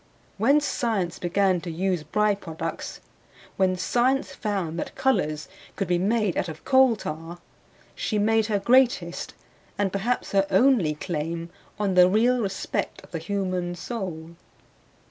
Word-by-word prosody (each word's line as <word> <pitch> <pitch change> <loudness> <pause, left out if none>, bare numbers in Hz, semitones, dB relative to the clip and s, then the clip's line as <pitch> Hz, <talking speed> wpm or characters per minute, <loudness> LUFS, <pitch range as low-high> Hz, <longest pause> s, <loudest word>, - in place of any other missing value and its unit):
When 275 +8 +5
science 220 - -1
began 185 0 +1
to 175 - -6
use 180 +1 -1
by 210 +8 +1
products; 165 -4 -6 0.5
when 185 -1 +2
science 250 +9 +1
found 190 -7 -3
that - - -5
colors 155 - 0 0.3
could 195 - -2
be 175 0 +1
made 210 0 +1
out 175 - -1
of 155 0 -10
coaltar, 190 - +2 0.6
she 215 - -2
made 220 +1 +2
her 210 -2 +1
greatest 235 -6 +2 0.4
and 200 -2 0
perhaps 230 +5 -1
her 195 0 +2
only 195 - +4
claim 165 +2 -4 0.3
on 205 -2 0
the 180 0 +7
real 240 +5 +3
respect 195 -3 -3
of - - -17
the 165 - -3
human 185 0 -2
soul. 175 -7 -5
190 Hz, 140 wpm, -25 LUFS, 170-220 Hz, 0.6 s, the